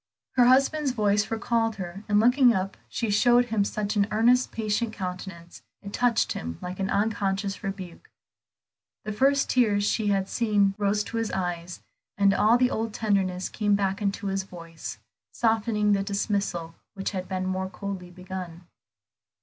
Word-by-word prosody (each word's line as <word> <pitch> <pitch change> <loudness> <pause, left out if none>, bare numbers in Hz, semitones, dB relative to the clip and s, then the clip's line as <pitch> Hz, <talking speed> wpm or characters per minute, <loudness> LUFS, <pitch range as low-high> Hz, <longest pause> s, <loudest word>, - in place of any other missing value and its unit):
Her 250 -2 +4
husband's 275 +2 +3
voice 210 -2 +1
recalled 225 0 0
her, 190 0 -7
and 205 0 +4
looking 245 +2 +5
up 190 +1 -2
she 230 -3 -2
showed 240 +4 +4
him 220 -4 +1
such 210 +1 -2
an 200 -1 +2
earnest, 240 +4 +3
patient 220 +1 -1
countenance, 180 -3 -7 0.2
it 200 0 -8
touched 245 -2 +2
him 80 0 -5
like 180 +1 -6
an 195 0 -1
unconscious 200 -1 -1
rebuke. 190 -3 -7 1.0
The 215 - -3
first 275 +6 +2
tears 210 -5 +3
she 210 +1 0
had 195 -1 +1
seen 205 -4 +2
rose 205 +1 +1
to 230 - -5
his 225 -1 -1
eyes, 175 -1 -4 0.3
and 200 -1 +4
all 220 +4 +4
the 250 0 +2
old 225 -1 -3
tenderness 190 -4 0
came 205 -2 +1
back 195 0 -1
into 200 0 -2
his 195 0 0
voice, 170 -3 -9 0.3
softening 220 -2 +1
the 200 -1 +3
dismissal 200 -4 -2 0.2
which 195 0 -3
had 185 -2 -4
been 185 -1 -2
more 185 0 -2
coldly 190 -1 -6
begun. 180 -1 -8
205 Hz, 160 wpm, -26 LUFS, 190-225 Hz, 1.0 s, looking